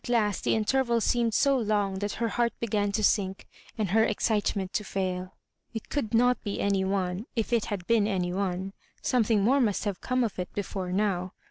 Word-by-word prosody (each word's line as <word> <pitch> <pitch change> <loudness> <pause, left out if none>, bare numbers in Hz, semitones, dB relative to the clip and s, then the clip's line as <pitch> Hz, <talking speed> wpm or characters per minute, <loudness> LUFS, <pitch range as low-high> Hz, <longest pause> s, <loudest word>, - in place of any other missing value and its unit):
last 220 -4 +1
the - - +2
interval 235 +2 +2
seemed 235 +1 +1
so 275 +5 +3
long 205 -5 0
that 205 0 -2
her 230 0 -1
heart 235 0 +1
began 205 -3 0
to 215 +1 -1
sink, 195 -2 +1 0.3
and 210 -5 -1
her 220 +2 +5
excitement 205 -3 0
to 210 - 0
fail 185 -2 -3 0.4
It 225 - -6
could 255 -8 -2
not 245 +2 +3
be 205 -2 -3
any 200 -1 +1
one 190 +2 -1
— - - -45
if 230 +1 -1
it 230 -3 +2
had 195 -4 -4
been 225 -1 +3
any 180 -4 -1
one, 190 0 -2 0.3
something 225 -4 +2
more 270 +6 +4
must 210 -5 +1
have 200 -3 -3
come 255 0 +1
of 220 -5 -3
it 180 - -4
before 190 -2 -3
now. 185 -2 0
210 Hz, 205 wpm, -28 LUFS, 190-230 Hz, 0.4 s, her